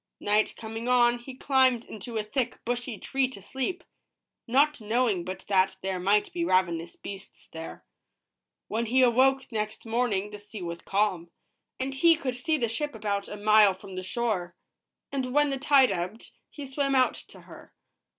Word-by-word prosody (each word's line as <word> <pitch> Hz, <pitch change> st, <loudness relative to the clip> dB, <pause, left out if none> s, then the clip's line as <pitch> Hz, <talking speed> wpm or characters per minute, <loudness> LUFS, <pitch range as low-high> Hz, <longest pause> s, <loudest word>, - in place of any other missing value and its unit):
Night 210 Hz, +1 st, +1 dB
coming 225 Hz, +1 st, -6 dB
on, 240 Hz, -1 st, +4 dB
he 255 Hz, +2 st, -10 dB
climbed 260 Hz, -3 st, +2 dB
into 220 Hz, +2 st, -7 dB
a 215 Hz, -, 0 dB
thick, 245 Hz, +3 st, -2 dB
bushy 240 Hz, -1 st, -3 dB
tree 270 Hz, +4 st, 0 dB
to 255 Hz, -5 st, -10 dB
sleep, 265 Hz, -, -4 dB, 0.6 s
not 280 Hz, +3 st, +3 dB
knowing 220 Hz, -4 st, +1 dB
but 185 Hz, +2 st, -7 dB
that 190 Hz, -1 st, +3 dB
there 190 Hz, -1 st, -2 dB
might 200 Hz, +3 st, +2 dB
be 345 Hz, -1 st, -1 dB
ravenous 175 Hz, -, +1 dB
beasts 195 Hz, -1 st, -10 dB
there. 160 Hz, 0 st, -8 dB, 0.8 s
When 225 Hz, +2 st, -2 dB
he 255 Hz, +3 st, +4 dB
awoke 260 Hz, +2 st, +3 dB
next 215 Hz, 0 st, -3 dB
morning, 225 Hz, -3 st, 0 dB
the 210 Hz, -, -8 dB
sea 205 Hz, -1 st, -9 dB
was 170 Hz, 0 st, -5 dB
calm, 195 Hz, -4 st, 0 dB, 0.5 s
and 265 Hz, +1 st, -2 dB
he 330 Hz, +5 st, +5 dB
could 270 Hz, -6 st, -3 dB
see 315 Hz, +5 st, 0 dB
the 240 Hz, -5 st, 0 dB
ship 270 Hz, +4 st, -3 dB
about 205 Hz, -2 st, -2 dB
a 205 Hz, -, -6 dB
mile 210 Hz, -1 st, +5 dB
from 190 Hz, 0 st, -12 dB
the 185 Hz, -, -3 dB
shore; 185 Hz, -3 st, -2 dB, 0.6 s
and 260 Hz, -1 st, -3 dB
when 295 Hz, -1 st, +4 dB
the 270 Hz, -, -2 dB
tide 275 Hz, -1 st, +5 dB
ebbed, 180 Hz, +6 st, -4 dB, 0.2 s
he 290 Hz, -, -8 dB
swam 275 Hz, 0 st, 0 dB
out 255 Hz, -1 st, +4 dB
to -, -, -13 dB
her. -, -, -14 dB
230 Hz, 175 wpm, -27 LUFS, 200-260 Hz, 0.8 s, he